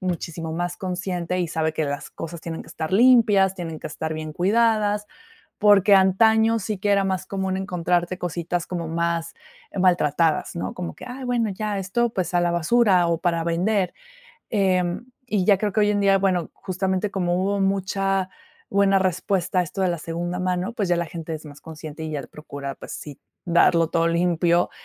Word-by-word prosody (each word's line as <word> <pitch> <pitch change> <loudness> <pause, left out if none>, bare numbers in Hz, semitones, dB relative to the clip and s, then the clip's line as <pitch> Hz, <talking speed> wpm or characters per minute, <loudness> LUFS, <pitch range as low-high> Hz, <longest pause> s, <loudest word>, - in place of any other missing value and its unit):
muchísimo 170 -3 -4
más 175 +2 -3
consciente 180 -1 -3
y 175 - -1
sabe 160 0 -1
que 155 - 0
las 145 -1 -4
cosas 165 0 -7
tienen 165 0 -6
que - - -16
estar 160 +2 -5
limpias, 210 -4 +5
tienen 165 -4 -6
que - - -5
estar 160 +1 -4
bien 155 0 -5
cuidadas. 210 +2 +2 0.5
Porque 205 -1 +5
antaño 220 +4 +4
sí 215 0 -3
que 205 - -1
era 200 -1 +3
más 190 -1 -2
común 190 -1 -2
encontrarte 180 -1 -1
cositas 175 0 -3
como 170 -3 -4
más 170 0 -2 0.4
maltratadas, 170 -4 +2
¿no? 95 +3 -3
Como 85 -2 -6
que: - - -11
"Ay, 255 +1 -7
bueno, 240 -3 0
ya 210 +1 -3
esto, 220 +6 0
pues, 185 -3 -2
a 175 - +3
la 175 0 +1
basura 185 +2 +3
o 165 -1 0
para 170 -1 0
vender". 180 +4 0 0.6
Em, 185 0 +1 0.2
y 205 -5 +1
ya 200 0 +5
creo 205 0 -1
que 215 - +1
hoy 205 0 +3
en 205 -1 +1
día, 195 -1 +4
bueno, 185 -4 0
justamente 190 +1 -2
como 175 -3 0
hubo 200 +2 0
mucha 195 0 0 0.4
buena 195 0 +4
respuesta 185 0 0
a - - +3
esto 190 +3 -4
de 185 - +2
la 170 -2 -1
segunda 175 +3 -4
mano, 185 +3 -1
pues 210 -5 -2
ya 175 - +3
la 170 0 -1
gente 165 0 -6
es 155 - -8
más 145 -1 -12
consciente 160 0 -8
y 155 - -4
ya 145 -2 -3
procura, 140 -2 -7
pues - - -9
sí, 145 -2 -8 0.3
darlo 170 -1 +4
todo 165 0 +2
limpio, 170 0 +2
180 Hz, 190 wpm, -23 LUFS, 170-195 Hz, 0.6 s, limpias